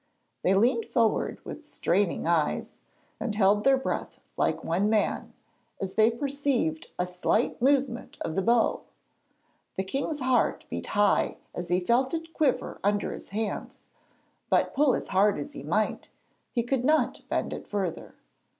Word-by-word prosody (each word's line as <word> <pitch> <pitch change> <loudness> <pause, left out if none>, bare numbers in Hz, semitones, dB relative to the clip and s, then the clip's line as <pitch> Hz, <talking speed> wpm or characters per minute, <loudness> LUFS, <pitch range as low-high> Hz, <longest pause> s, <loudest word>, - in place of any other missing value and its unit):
They 190 - +3
leaned 230 +3 +3
forward 230 -3 +1
with 310 - -7
straining 200 - 0
eyes, 165 -2 +1 0.5
and 220 -4 -2
held 205 0 +4
their 270 0 +5
breath 265 - -3 0.2
like - - 0
one 185 +6 +1
man, 215 -1 0 0.4
as 190 -1 -3
they 220 +1 +5
perceived 265 - -1
a 180 - +1
slight 180 +7 0
movement 270 -2 +1
of 160 - -3
the 195 - +2
bow. 230 +3 +2 0.9
The 190 - -1
king's 275 +9 -2
heart 255 -1 +1
beat - - -4
high 205 0 +3 0.2
as 175 -1 -5
he 175 +1 +3
felt 245 - +2
it 325 0 -6
quiver 290 -5 0
under 205 +1 +1
his - - -10
hands, 210 +1 -4 0.7
but, - - +2
pull 285 -1 +4
as - - -5
hard 200 +2 +3
as 145 - -6
he - - -7
might, 190 +10 -1 0.4
he 235 - 0
could 245 +1 0
not 305 +3 +2
bend - - -1
it - - -7
further. 195 -5 -3
220 Hz, 155 wpm, -27 LUFS, 190-265 Hz, 0.9 s, their